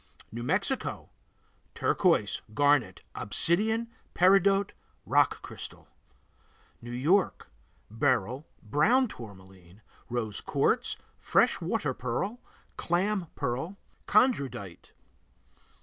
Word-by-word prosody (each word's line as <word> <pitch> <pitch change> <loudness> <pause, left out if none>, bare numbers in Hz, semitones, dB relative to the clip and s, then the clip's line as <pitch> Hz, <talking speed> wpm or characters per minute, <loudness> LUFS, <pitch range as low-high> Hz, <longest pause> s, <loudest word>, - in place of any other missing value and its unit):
New 115 +2 -6
Mexico 195 - -2 0.6
Turquoise, 165 - +1
garnet, 145 -9 +2
obsidian, 220 +7 +1 0.3
peridot, 195 +2 +4 0.3
rock - - +2
crystal. - - -9 0.9
New 120 - -9
York 155 +11 +1 0.4
Beryl, 125 - 0 0.2
brown 220 - +3
tourmaline, 95 - -13 0.3
rose 115 -5 -2
quartz, - - 0 0.2
fresh - - +2
water - - -1
pearl, 195 - -3 0.4
clam 185 +1 0
pearl, 140 +8 -3 0.3
chondrodite. 140 - +1
145 Hz, 80 wpm, -29 LUFS, -, 0.9 s, peridot